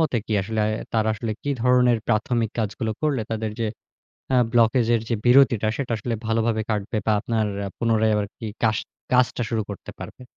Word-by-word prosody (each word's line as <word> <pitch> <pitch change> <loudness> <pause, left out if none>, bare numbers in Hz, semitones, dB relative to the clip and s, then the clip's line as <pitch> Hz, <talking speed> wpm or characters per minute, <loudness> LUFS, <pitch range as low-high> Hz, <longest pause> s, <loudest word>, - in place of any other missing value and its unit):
মতে 155 -6 +1
কি 110 - -3
আসলে, 110 +2 -2 0.3
তারা 110 -1 +2
আসলে 110 0 -3
কি 145 - -2
ধরনের 125 -2 +4
প্রাথমিক 110 +1 +1
কাজগুলো 110 +1 -1
করলে, 145 -6 +1
তাদের 110 -1 -2
যে 115 - +1 0.7
আ - - +5 0.2
ব্লকেজ 115 0 +4
এর 115 - +2
যে 120 - +1
বিরতিটা, 120 -4 +5
সেটা 130 -4 -3
আসলে 115 +3 -3
ভালোভাবে 110 0 +1
কাটবে? 105 +1 -2
বা 110 - +3
আপনার 110 -2 0 0.2
আ - - -3
পুনরায় 110 -1 +2
আরকি 105 +2 -6 0.2
কাশ 110 -2 +3 0.4
কাজটা 125 -1 +3
শুরু 110 -2 0
করতে 100 - -8
পারবে? - - -9
115 Hz, 180 wpm, -23 LUFS, 110-120 Hz, 0.7 s, আ